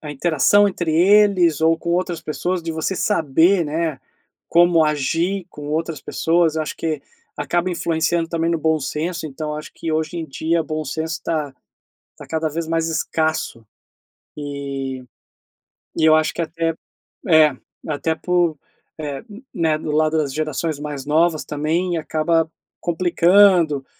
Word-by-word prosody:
a 150 - -7
interação 175 +7 +3
entre 175 -4 -2
eles 185 -3 +4
ou 165 +1 +4
com 170 - -4
outras 175 -1 -1
pessoas, 175 +3 -2
de 165 - -4
você 160 +4 -2
saber, 170 0 +2
né, 155 -2 -2 0.5
como 170 -1 +5
agir 165 +6 0
com 145 -3 -9
outras 160 -1 -2
pessoas, 165 -1 +1
eu 155 - +1
acho - - -6
que 155 -3 -2 0.4
acaba 175 +5 -1
influenciando 165 0 0
também 165 0 0
no 170 - 0
bom 160 0 +1
senso. 160 +4 -3
Então, 150 +1 -5
acho 155 - -8
que, 165 - -4
hoje 160 +2 -1
em 165 - -3
dia, 160 +4 -1
o - - -2
bom 155 0 -3
senso 160 +3 -3
tá 150 -5 -2 0.6
tá - - -11
cada 160 0 -1
vez 165 +2 -4
mais 165 0 0
escasso, 160 -6 -1 0.7
e 140 -3 -5 0.9
e 160 - +2
eu 155 0 +7
acho 155 -1 +1
que - - -3
até 165 0 -1 0.5
é, 155 -4 +5 0.3
até 160 +2 -1
por, 175 -2 0 0.4
eh 145 -3 -4 0.3
né, 160 -3 +1
do 155 -1 -4
lado 155 +1 +2
das 140 -4 -1
gerações 155 0 -2
mais 145 -2 -6
novas 160 +1 +2
também 165 +4 -1
acaba 160 +1 0 0.3
complicando 175 -3 +4
160 Hz, 155 wpm, -21 LUFS, 150-170 Hz, 0.9 s, eu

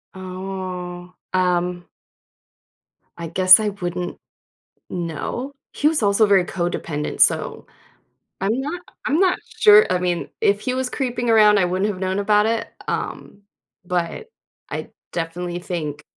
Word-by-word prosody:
Oh. 185 -1 -6 0.2
Um 180 -1 0 1.3
I 170 -1 -5
guess 185 +4 +7
I 215 -1 0
wouldn't 180 -2 -4 0.7
know. 180 - -4 0.2
He 295 - +2
was 310 -7 0
also 205 +1 +4
very 195 -3 +4
codependent, 170 -4 -3
so, - - +2 0.7
I'm 220 +7 0
not 320 +6 -4 0.3
I'm 300 +7 +2
not 370 -2 +3 0.2
sure, 425 0 +8
I 180 - +2
mean, 175 -1 -1
if 200 +1 +2
he 255 -1 -2
was 260 -1 -2
creeping 245 -3 -2
around, 210 -2 +6
I 185 - +3
wouldn't 185 +4 0
have 185 -2 -6
known 190 +1 -1
about 210 +1 +3
it, 230 0 0 0.2
um, 200 - -4 0.4
but 180 - -3 0.4
I - - -5 0.2
definitely 175 +1 -3
think 150 -5 -4
185 Hz, 135 wpm, -21 LUFS, 175-220 Hz, 1.3 s, sure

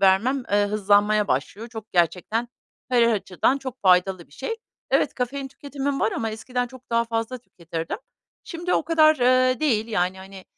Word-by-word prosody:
vermem, 205 +8 +3
eee, 205 0 +3
hızlanmaya 205 0 +3
başlıyor. 195 - -2
Çok 220 -2 -10
gerçekten 180 +7 +1 0.4
her 250 -2 +4
açıdan 230 +3 +1
çok 260 -2 -7
faydalı 185 -1 +3
bir - - -25
şey. 450 - -4 0.3
Evet, - - +2
kafein 270 +2 -3
tüketimim 280 0 -4
var 220 - +1
ama 225 -1 -2
eskiden 245 +3 -3
çok 260 0 -15
daha 230 0 +2
fazla 230 +2 -3
tüketirdim. 165 - -6 0.5
Şimdi 345 +1 -2
o - - +2
kadar, 310 -1 +5
eee, 255 +1 +3
değil, 225 -8 +1
yani, 185 -3 0
hani, 190 0 -11
225 Hz, 165 wpm, -24 LUFS, 195-260 Hz, 0.5 s, kadar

